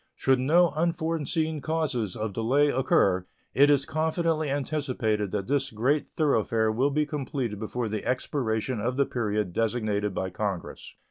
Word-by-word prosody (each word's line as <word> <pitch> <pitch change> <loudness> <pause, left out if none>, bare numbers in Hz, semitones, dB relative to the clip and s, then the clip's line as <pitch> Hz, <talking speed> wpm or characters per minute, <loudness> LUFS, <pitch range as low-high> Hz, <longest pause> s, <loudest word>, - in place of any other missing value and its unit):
Should 130 -1 +2
no 165 +7 +4
unforeseen 160 -1 -1
causes 145 - -1
of 110 -1 -3
delay 130 +8 +2
occur, 95 -8 +2 0.3
it 140 +2 +5
is 140 -2 +3
confidently 160 0 0
anticipated 130 -7 -1
that 100 0 -2
this 135 +2 0
great 130 +7 0
thoroughfare 115 -7 +2
will 130 +6 +1
be 150 +1 +1
completed 135 -7 -3
before 115 +2 -3
the 110 0 -3
expiration 125 -2 -1
of 125 +4 -2
the 140 - +3
period 105 -7 -2
designated 105 -3 -1
by 95 0 -2
Congress. 100 -3 -5
130 Hz, 145 wpm, -27 LUFS, 110-150 Hz, 0.3 s, it